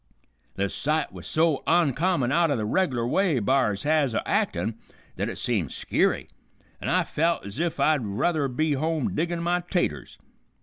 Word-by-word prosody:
The 100 - 0
sight 150 +9 -1
was - - -8
so 160 -2 +2
oncommon 165 -3 +2
out 170 +2 +3
o' 145 - +1
the 110 -3 -2
reg'lar 125 - 0
way 175 +1 +2
b'ars 115 -4 +1
has 150 -5 +2
o' - - +1
actin' 100 +7 0 0.4
that - - -2
it - - -6
seemed 100 - -1
skeery, - - 0 0.5
an' - - -3
I - - +3
felt 165 -3 0
ez 100 +7 -7
if 170 -1 -1
I'd 155 -5 +3
ruther 140 +9 0
be 150 +4 0
home 155 +1 -1
diggin' 170 +1 -1
my 175 +1 +1
'taters. 175 - -2
150 Hz, 170 wpm, -25 LUFS, 120-170 Hz, 0.5 s, out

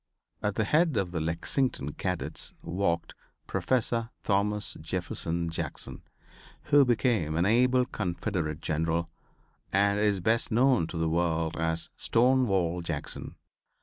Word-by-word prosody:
At 105 -1 -1
the 110 - +1
head 155 +3 +2
of 90 -3 0
the 85 - -2
Lexington 85 - -1
cadets 90 -2 -3
walked 85 -1 -1 0.3
Professor 115 -2 0
Thomas 105 0 0
Jefferson 85 0 -2
Jackson, - - -5 0.6
who 145 0 +5
became 115 - +1
an 85 +2 +2
able 125 +4 +4
Confederate 85 - -3
General 80 +2 -1 0.6
and 100 +1 +3
is 105 -2 +2
best 110 +6 +1
known 125 -5 +4
to 85 - -6
the 80 0 +1
world 80 -1 0
as 80 0 -1
"Stonewall 110 -9 +2
Jackson." 75 -4 -5
95 Hz, 120 wpm, -29 LUFS, 85-115 Hz, 0.6 s, who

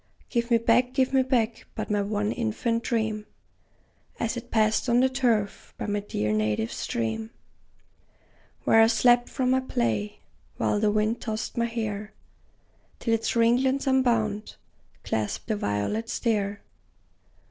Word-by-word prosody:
Give 235 -1 0
me 235 - +5
back, 240 +2 +2
give 265 0 +1
me 265 - +5
back 240 -3 0
but - - -4
my 205 -1 +2
one 205 +1 -1
infant 230 0 -1
dream, 220 -3 -1 0.9
As 230 +1 -1
it 240 0 -7
passed 220 +2 +2
on 240 +1 +4
the 260 +1 +4
turf 235 -6 -1
by - - -4
my 205 0 -1
dear 105 - -2
native 105 +1 0
stream, 115 - -3 1.3
Where 225 - +5
I 225 - +7
slept 240 +2 +4
from 255 -1 0
my 260 - +4
play, 110 - -2 0.4
while 210 - +1
the 210 0 +2
wind 215 +2 0
tossed 220 +1 -4
my 235 - +1
hair, 215 -3 -4 0.8
Till 230 - -1
its 225 +1 0
ringlets, 255 +4 +3
unbound, 230 -6 +1 0.5
clasped 110 -1 -2
the 215 - +1
violets 205 - -2
there. 205 -4 -1
225 Hz, 145 wpm, -26 LUFS, 205-240 Hz, 1.3 s, I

